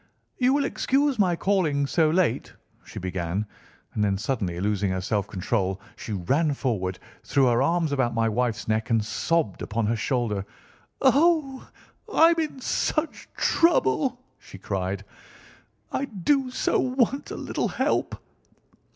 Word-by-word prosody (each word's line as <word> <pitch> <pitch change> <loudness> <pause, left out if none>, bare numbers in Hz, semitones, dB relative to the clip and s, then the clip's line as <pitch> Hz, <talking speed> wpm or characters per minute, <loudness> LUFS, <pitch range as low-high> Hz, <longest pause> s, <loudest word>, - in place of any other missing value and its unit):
"You 255 +1 +4
will 285 - +1
excuse 275 -2 +1
my 180 -4 +3
calling 165 -7 +1
so 155 +3 +2
late," 175 +1 +1 0.3
she - - -12
began, 90 +2 -2 0.5
and 105 - 0
then, 100 -1 +1
suddenly 100 -6 -2
losing 100 0 0
her 95 0 -1
self 100 +2 -1
control, 95 0 -1 0.2
she 110 - -6
ran 140 - +1
forward, 95 -9 -2 0.3
threw 135 0 +2
her 120 0 +3
arms 165 +2 +1
about 130 -4 0
my 115 0 +2
wife's 115 0 -1
neck, 110 +2 0
and 110 -2 +2
sobbed 160 - -1
upon 110 +1 -1
her 115 +3 +1
shoulder. 115 -3 -1 0.6
"Oh, 280 0 +3 0.4
I'm 330 -1 +5
in 305 -4 -3
such 310 +5 -1
trouble!" 260 - +2 0.2
she - - -12
cried; 95 0 -3 0.9
"I 275 - -1
do 265 +4 0
so 250 - 0
want 260 +2 0
a - - -5
little - - -2
help." - - -1
130 Hz, 140 wpm, -25 LUFS, -, 0.9 s, I'm